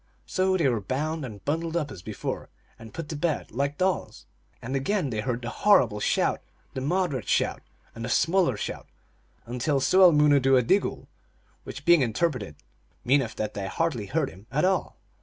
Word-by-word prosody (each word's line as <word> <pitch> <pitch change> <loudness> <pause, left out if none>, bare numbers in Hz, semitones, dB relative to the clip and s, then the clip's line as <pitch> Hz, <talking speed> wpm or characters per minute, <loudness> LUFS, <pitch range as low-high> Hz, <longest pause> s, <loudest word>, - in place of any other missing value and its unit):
So 190 0 +1
they 165 -6 +2
were 120 -5 0
bound 150 +8 -2
and 105 -6 -9
bundled 165 +3 -1
up 150 -4 -2
as 90 - -9
before, - - -5 0.3
and 115 -1 -11
put 165 -2 -6
to 155 - -4
bed 155 +1 -2
like 140 +4 -2
dolls. 185 - -1 0.3
And 130 +3 -5
again 145 +1 0
they 110 - -2
heard 120 +2 -2
the 120 - -4
horrible 130 - +3
shout, - - +1 0.3
the 130 - -4
moderate 150 - -1
shout, - - +1 0.3
and 115 - -8
the 120 - -3
smaller 165 - +2
shout, - - -5 0.6
until 125 +4 -1
sooel 185 +6 +6
moonoodooa/idigool, 145 - +3 0.6
which, - - -8
being 170 -3 +6
interpreted, 125 - -1 0.5
mean 135 +3 +4
eth 115 -4 -5
that 105 -1 -3
they 100 -1 -4
hardly 125 - -2
heard - - -1
him 95 +4 -16
at 150 +5 +1
all. 190 0 0
140 Hz, 175 wpm, -26 LUFS, 115-165 Hz, 0.6 s, sooel